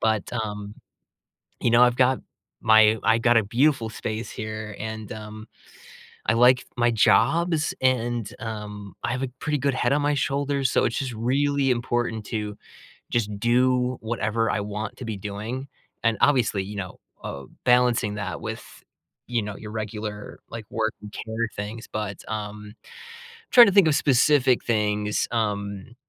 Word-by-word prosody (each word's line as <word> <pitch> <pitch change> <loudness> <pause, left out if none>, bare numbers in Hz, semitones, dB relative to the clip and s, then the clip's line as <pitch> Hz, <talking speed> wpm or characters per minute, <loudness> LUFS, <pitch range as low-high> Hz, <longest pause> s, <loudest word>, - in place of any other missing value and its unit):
but, 110 -2 0
um, 105 -2 -4 0.9
you 120 - +2
know, 120 +1 +6
I've 125 -1 +5
got 130 0 +3 0.4
my 110 0 +6
I 115 0 +4
got 120 0 +3
a 115 - +5
beautiful 120 +2 +2
space 110 +1 -5
here, 110 -1 -6
and, 110 0 -6
um, 110 0 -9 0.8
I 110 - +4
like 125 +2 +5
my 120 0 +3
jobs, 155 - +3
and, 120 -4 +1
um, 105 -3 -7
I - - -1
have 130 - -2
a 135 - -2
pretty 150 -1 -1
good 140 0 0
head 120 -1 0
on 145 0 +1
my 145 0 +2
shoulders, 140 -1 0
so - - +2
it's - - -1
just 130 -3 -3
really 135 +4 +1
important 120 -2 -1
to 105 -2 -4 0.5
just 105 -3 -1
do 125 +2 +2
whatever 115 0 -1
I 105 - 0
want 105 +1 -5
to 130 - -7
be 110 -3 -4
doing, 105 +7 -5 0.4
and, 115 -1 +3
obviously, 120 -8 +3
you 100 +2 -7
know, 90 -3 -6 0.2
uh, 70 0 -6 0.2
balancing 125 -4 +3
that 100 -4 -4
with, - - -5 0.6
you 120 -2 -1
know, 105 -1 -6
your 105 - -9
regular, 105 -1 -6
like, 115 -1 -7
work 110 0 -1
and 105 0 -10
care 110 +1 -3
things, 105 +3 -6
but, 105 -2 -4
um, 105 -1 -6 0.8
trying 240 -2 +10
to 195 - +2
think 200 -3 +6
of 150 - +3
specific 135 -2 +3
things, 105 -2 0
um 105 0 -3
115 Hz, 160 wpm, -25 LUFS, 105-125 Hz, 0.9 s, trying